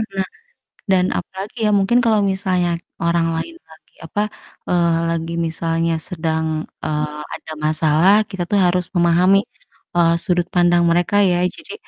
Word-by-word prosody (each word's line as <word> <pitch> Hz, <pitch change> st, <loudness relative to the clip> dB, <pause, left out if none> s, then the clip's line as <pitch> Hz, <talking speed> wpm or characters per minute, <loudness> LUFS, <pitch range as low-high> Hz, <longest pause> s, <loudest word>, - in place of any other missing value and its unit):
Nah 190 Hz, -1 st, -1 dB, 0.6 s
dan 185 Hz, -1 st, +4 dB
apalagi 195 Hz, +6 st, -7 dB
ya, -, -, +2 dB
mungkin 225 Hz, +5 st, +3 dB
kalau 220 Hz, -2 st, +3 dB
misalnya 185 Hz, -2 st, 0 dB, 0.3 s
orang 170 Hz, 0 st, +2 dB
lain 335 Hz, -, -5 dB
lagi -, -, -20 dB
apa, 205 Hz, -, -2 dB, 0.5 s
eee, 170 Hz, -2 st, +2 dB
lagi 165 Hz, 0 st, -2 dB
misalnya 165 Hz, 0 st, -1 dB
sedang, 160 Hz, -3 st, -2 dB, 0.4 s
eee, 150 Hz, 0 st, -2 dB
ada 160 Hz, -, -11 dB
masalah 155 Hz, +4 st, +3 dB, 0.2 s
kita 190 Hz, -3 st, -3 dB
tuh 205 Hz, -, +2 dB
harus 180 Hz, 0 st, +1 dB
memahami, 175 Hz, +3 st, +4 dB, 0.6 s
eee, 170 Hz, -1 st, +4 dB
sudut 175 Hz, -2 st, 0 dB
pandang 175 Hz, -1 st, +4 dB
mereka 175 Hz, +3 st, +1 dB, 0.2 s
ya. 175 Hz, -, +1 dB, 0.2 s
Jadi 330 Hz, -, -11 dB
175 Hz, 140 wpm, -19 LUFS, 165-190 Hz, 0.6 s, dan